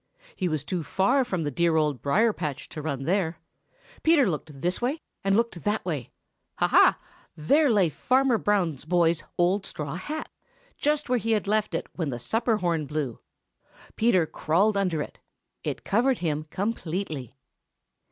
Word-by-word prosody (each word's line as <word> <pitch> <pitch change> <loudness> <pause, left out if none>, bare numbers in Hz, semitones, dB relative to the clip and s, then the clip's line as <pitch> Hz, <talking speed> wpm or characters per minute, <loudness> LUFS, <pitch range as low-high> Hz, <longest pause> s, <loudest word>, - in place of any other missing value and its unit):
He 185 - -1
was 155 -4 -1
too 180 +3 -2
far 220 - +2
from 185 -9 -2
the 145 - -2
dear 170 +4 +2
Old 150 -6 +1
Briar 215 +11 +3
patch 150 -6 -4
to 155 - -6
run 140 -3 -3
there. 170 +1 0 0.6
Peter 315 -6 +5
looked 150 -4 -4
this 180 +5 0
way 265 +6 0 0.2
and 195 +1 +3
looked 230 -7 -1
that 210 +1 0
way. 145 -9 -3 0.5
Ha! - - +2
ha! - - +6 0.4
There 285 - +3
lay 200 -7 +4
Fanner 255 - +2
Brown's 180 -11 0
boy's 170 0 +2
old 185 +3 +2
straw 150 -6 -5
hat, 295 - -5 0.5
just 300 0 0
where 250 -1 +2
he 225 +1 0
had 210 -2 0
left 215 +1 +1
it - - -2
when 165 -5 -2
the 120 - -3
supper 225 - 0
horn 170 -6 -1
blew. 150 -6 -3 0.8
Peter 215 -7 +3
crawled 190 +8 +1
under 180 -6 0
it. - - -12 0.4
It - - -4
covered 245 +5 +2
him 155 -3 -2
completely. 165 - -3
180 Hz, 165 wpm, -26 LUFS, 155-220 Hz, 0.8 s, ha